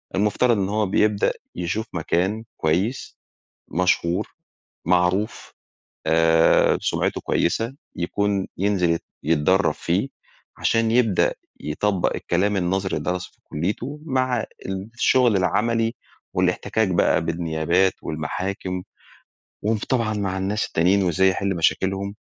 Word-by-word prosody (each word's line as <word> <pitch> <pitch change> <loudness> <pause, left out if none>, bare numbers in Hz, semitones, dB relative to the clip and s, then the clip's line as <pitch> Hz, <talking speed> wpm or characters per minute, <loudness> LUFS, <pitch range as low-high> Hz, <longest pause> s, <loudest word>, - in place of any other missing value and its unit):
المفترض 105 +4 +2
إن 95 -1 0
هو 105 0 +1
بيبدأ 105 +2 +2 0.2
يشوف 95 +6 -2
مكان 95 +6 0
كويّس 95 +11 -1 0.5
مشهور 85 0 +1 0.6
معروف 90 +4 +1 0.6
آآ، 80 0 +4
سمعته - - -1
كويّسة 115 +4 0 0.2
يكون 100 +2 -1
ينزل 95 -3 +1
يت 85 - -1 0.2
يتدرب 80 +5 +3
فيه 95 +10 -1 0.5
عشان 115 -1 +1
يبدأ 115 -5 +3 0.3
يطبق 95 +5 0
الكلام 100 +4 0
النظري 95 +1 0
اللي - - -2
درسه 90 - -4
في - - -34
كليته 110 - -3
مع 130 -4 0 0.5
الشغل 120 -3 +3
العملي 115 +5 +1 0.4
والاحتكاك 110 -2 +1
بقى 85 -2 +2
بالنيابات 85 +2 +1
والمحاكم 90 +4 -3 0.8
وم 110 +1 +1
طبعًا 115 -4 +1
مع 95 -2 -2
الناس 100 +3 -1
التانيين 95 +4 +2
وإزاي 95 +2 +3
يحل 95 0 -1
مشاكلهم. 95 +4 0
95 Hz, 110 wpm, -23 LUFS, 85-105 Hz, 0.8 s, آآ